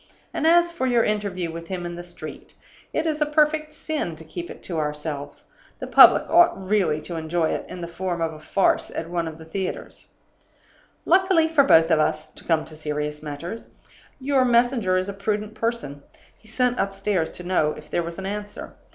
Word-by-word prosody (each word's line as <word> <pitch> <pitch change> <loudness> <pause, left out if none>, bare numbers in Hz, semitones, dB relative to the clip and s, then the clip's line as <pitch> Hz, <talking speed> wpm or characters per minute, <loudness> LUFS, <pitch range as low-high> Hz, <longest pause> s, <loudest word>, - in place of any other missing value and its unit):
And 315 - 0
as 345 +1 +5
for 305 -6 -2
your 240 -2 +3
interview 200 -5 -1
with 165 0 -8
him 180 -1 -4
in 175 0 -5
the 175 - -7
street, 175 0 -10 0.4
it - - -1
is 310 -1 -1
a - - +4
perfect 305 0 +2
sin 300 - -3
to 160 - -12
keep 170 +2 -7
it - - -11
to 170 -3 -3
ourselves. 150 -1 -4 0.3
The - - -6
public - - +7
ought 345 - +5
really 190 -5 +1
to 165 +2 -6
enjoy 160 0 0
it - - -3
in 180 - -7
the 170 - -4
form 175 0 -3
of 165 -1 -1
a 155 - -11
farce 190 +5 +1
at 165 +1 -6
one 170 -2 -1
of 160 -1 -7
the 160 - -12
theaters. 185 +3 -5 1.0
"Luckily 365 -2 +4
for 320 -3 +4
both 165 -10 +5
of 160 - +4
us 155 0 -1
(to - - -12
come 165 -2 +1
to 155 - -8
serious 150 -1 -4
matters), 155 +8 -7 0.4
your 270 -1 +2
messenger 235 -6 +3
is 185 +1 -1
a 200 - -4
prudent 210 +1 -2
person. 225 - -3 0.3
He 220 - -24
sent 250 +2 0
upstairs 195 -3 0
to 180 - -9
know 175 -4 +1
if 150 - -13
there - - +1
was 170 0 -6
an 190 - -6
answer. 205 +1 -6
185 Hz, 205 wpm, -24 LUFS, 160-245 Hz, 1.0 s, public